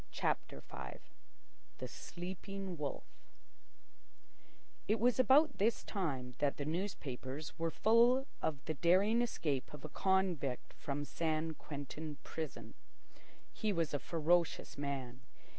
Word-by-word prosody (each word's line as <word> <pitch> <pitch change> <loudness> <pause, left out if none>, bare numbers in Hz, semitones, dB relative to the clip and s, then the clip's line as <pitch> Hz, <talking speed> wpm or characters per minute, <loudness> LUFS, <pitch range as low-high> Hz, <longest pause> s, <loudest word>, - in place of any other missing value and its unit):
CHAPTER 70 - -1
V - - -7 0.8
THE - - -4
SLEEPING 190 +1 -6
WOLF 150 -3 -3 1.8
It 215 +2 +3
was 245 +3 +3
about 280 +5 +6
this 220 +3 +2
time 135 -11 -2
that 145 -1 +2
the 145 - -2
newspapers 150 -5 -3
were 165 0 +1
full 235 +8 +5 0.2
of 145 -3 -1
the 160 - -1
daring 190 - +4
escape 150 - -1
of 150 - -9
a - - -5
convict 180 -8 +1
from 145 +1 -3
San 160 0 0
Quentin 150 +1 -6
prison. 120 -8 -5 0.8
He 215 - 0
was 165 -5 0
a 145 - +1
ferocious 170 +2 +1
man. 135 -3 -4
160 Hz, 120 wpm, -36 LUFS, 145-195 Hz, 1.8 s, about